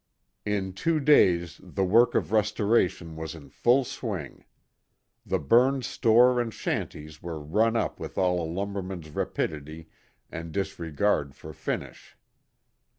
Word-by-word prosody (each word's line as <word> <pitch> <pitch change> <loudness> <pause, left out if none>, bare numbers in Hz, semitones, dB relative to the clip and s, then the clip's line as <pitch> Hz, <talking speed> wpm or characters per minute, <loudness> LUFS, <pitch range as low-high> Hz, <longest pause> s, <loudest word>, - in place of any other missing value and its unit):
In 95 -2 -1
two 165 - 0
days 90 - +3
the 95 - -2
work 115 +6 +4
of - - 0
restoration 105 -5 +1
was 80 0 -6
in 70 -4 -12
full 120 - +3
swing. 100 - -6 0.8
The 95 - +1
burned 125 - +3
store 120 +1 +4
and 115 -1 -3
shanties 75 -6 -4
were 85 -2 -5
run 105 +10 +1
up 115 - -1
with - - -7
all 90 -1 +2
a 80 - -4
lumberman's 95 -3 -4
rapidity 75 +2 -4 0.4
and 80 0 -6
disregard 85 -5 -1
for 80 +3 -10
finish. - - -6
95 Hz, 130 wpm, -27 LUFS, 80-115 Hz, 0.8 s, work